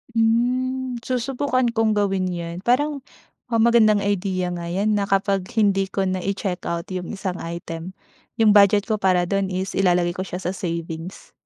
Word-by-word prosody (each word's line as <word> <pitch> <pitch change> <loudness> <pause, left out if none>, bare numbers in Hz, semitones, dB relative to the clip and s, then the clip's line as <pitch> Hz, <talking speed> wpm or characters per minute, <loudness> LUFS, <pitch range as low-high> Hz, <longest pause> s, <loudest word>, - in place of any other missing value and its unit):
Hmm, 250 +2 +1
susubukan 255 0 -1
kong 225 -2 +1
gawin 195 -2 +1
yan. 170 -1 -5
Parang 285 +4 +2 0.5
um, 230 -2 0
magandang 220 -3 +4
idea 190 -2 -1
nga 170 -1 -5
yan 195 +5 0
na 205 -1 0
kapag 195 -1 +1
hindi 195 -3 +2
ko 195 +1 -2
na 185 0 -1
i-checkout 180 -3 -3
yung 180 -2 -4
isang 190 -2 -4
item, 170 +1 -6 0.4
yung 225 -2 +4
budget 205 0 +6
ko 215 -1 -2
para 185 -2 +3
dun 195 +2 0
is 185 0 -3
ilalagay 180 -2 +2
ko 185 +1 -4
siya 180 +1 -6
sa 180 - -1
savings. 170 -1 -6
195 Hz, 160 wpm, -22 LUFS, 180-225 Hz, 0.5 s, budget